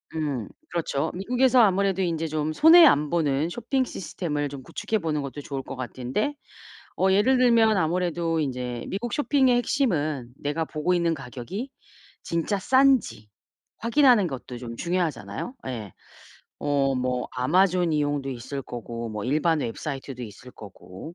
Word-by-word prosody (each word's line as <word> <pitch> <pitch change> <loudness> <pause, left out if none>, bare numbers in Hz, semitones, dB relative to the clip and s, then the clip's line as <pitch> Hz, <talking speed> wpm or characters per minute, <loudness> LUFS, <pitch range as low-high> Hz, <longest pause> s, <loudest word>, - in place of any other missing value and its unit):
음. 140 -9 -2 0.2
그렇죠. 160 -3 -1
미국에서 250 +6 +3
아무래도 195 -2 +2
인제 165 -2 -1
좀 155 0 -2
손해 325 - +8
안 150 - +4
보는 155 -2 +1
쇼핑 240 +7 -1
시스템을 150 - -4
좀 140 -1 -8
구축해 220 +11 -3
보는 155 -4 -1
것도 140 +1 -6
좋을 135 -1 -5
것 135 - -7
같은데 130 - -3 0.6
어 190 0 +2
예를 210 +7 +4
들면 230 -3 +4
아무래도 170 -1 0
인제 125 -4 -3
미국 220 +4 -4
쇼핑의 270 -3 +3
핵심은 155 - 0
내가 145 +3 -2
보고 155 +3 -1
있는 170 -1 +1
가격이 140 - -6 0.5
진짜 170 +5 -1
싼지 260 - +2 0.5
확인하는 235 -3 +4
것도 130 -4 -7
좀 120 -1 -7
중요하잖아요. 170 - -3
예. 110 -7 -6 0.7
어 140 -2 +1
뭐 125 -1 -2
아마존 175 +6 +2
이용도 145 -2 -1
있을 135 +2 -6
거고 115 -1 -6
뭐 105 -1 -5
일반 155 +4 +1
웹사이트도 135 +1 -5
있을 120 +3 -10
거고. 100 - -11
155 Hz, 310 characters per minute, -25 LUFS, 130-195 Hz, 0.7 s, 손해